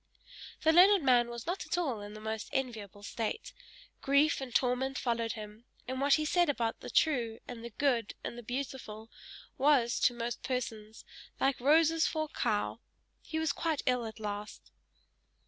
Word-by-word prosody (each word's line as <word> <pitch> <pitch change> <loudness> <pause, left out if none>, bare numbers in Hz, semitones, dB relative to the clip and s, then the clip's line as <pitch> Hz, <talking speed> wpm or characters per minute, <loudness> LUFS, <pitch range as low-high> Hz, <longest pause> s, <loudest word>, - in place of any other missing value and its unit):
The 320 - +5
learned 375 +1 +7
man 245 -2 +4
was 235 -1 -7
not 355 +3 -2
at - - -1
all 270 -12 -1
in 205 +1 -8
the - - -8
most 220 0 -4
enviable 220 -7 -4
state; 235 - -4 0.5
grief 280 +2 +3
and 265 -2 -5
torment 255 +2 +1
followed 230 -2 -1
him, 215 +1 -9 0.2
and 260 +1 -3
what 280 0 +5
he 310 - -1
said 350 +2 +3
about 235 -5 -1
the - - -8
true, 240 -8 +2
and 235 -2 -8
the 235 - -6
good, 240 -2 0
and - - -5
the 240 - -7
beautiful, 240 -3 -6 0.5
was, 260 -4 +3
to 245 - +3
most 235 0 -4
persons, 225 -4 -4 0.3
like 270 0 +1
roses 320 +4 +4
for 315 -1 -1
a 305 - -16
cow! - - 0 0.4
He 315 - -5
was 320 -2 +1
quite 320 0 -1
ill 250 -3 +1
at 220 - -9
last. 210 0 -6
250 Hz, 175 wpm, -31 LUFS, 225-290 Hz, 0.5 s, learned